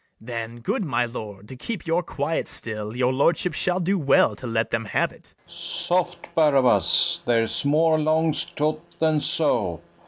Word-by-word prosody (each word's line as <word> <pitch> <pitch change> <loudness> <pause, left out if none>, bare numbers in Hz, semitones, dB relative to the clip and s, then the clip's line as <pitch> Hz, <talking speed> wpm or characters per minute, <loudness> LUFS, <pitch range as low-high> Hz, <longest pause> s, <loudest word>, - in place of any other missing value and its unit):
Then, 115 0 -6
good 160 - -1
my 135 -7 0
lord, 105 -4 -8
to 130 - -8
keep 195 - -5
your 165 +1 +1
quiet 155 -1 -3
still, 110 0 -1
Your 125 0 +2
lordship 165 +5 +2
shall 180 +4 +1
do 190 +2 0
well 140 -3 +3
to 130 - -7
let 115 0 -1
them 115 0 -1
have - - 0
it. - - -18
FERNEZE. - - -16
Soft, 175 0 -2
Barabas! 130 - +3
there's 115 -2 +1
more 155 +2 +3
'longs 155 -1 +1
to't 155 +1 -2 0.2
than 155 -1 +2
so. 115 - 0
140 Hz, 165 wpm, -24 LUFS, 115-160 Hz, 0.2 s, well